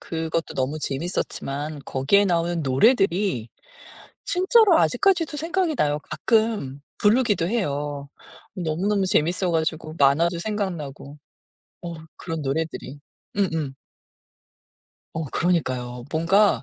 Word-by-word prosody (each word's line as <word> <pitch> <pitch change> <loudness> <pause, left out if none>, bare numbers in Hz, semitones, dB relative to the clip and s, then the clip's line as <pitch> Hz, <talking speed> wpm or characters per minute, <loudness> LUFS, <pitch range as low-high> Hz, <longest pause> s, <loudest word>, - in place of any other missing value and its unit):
그것도 165 0 -3
너무 135 +4 -1
재밌었지만 145 -1 -3
거기에 140 +10 +3
나오는 170 -2 0
노래들이 180 - +2 0.8
진짜로 375 0 +4
아직까지도 345 -7 +2
생각이 335 +2 0
나요. 150 -7 +1
가끔 215 - 0 0.2
부르기도 210 -5 +3
해요. 145 -9 -2 0.5
너무너무 190 +3 0
재밌어 180 +2 +1
가지고 160 -1 -1
만화도 160 +5 +3
생각나고 170 -8 -4 0.6
어 170 -1 -5 0.2
그런 165 -3 -5
노래들이. 145 0 -3 0.4
음음. 160 -8 -1 1.4
어 160 - -2
그러니까요. 130 -7 -1
뭔가 190 +6 +3
165 Hz, 270 characters per minute, -24 LUFS, 145-205 Hz, 1.4 s, 진짜로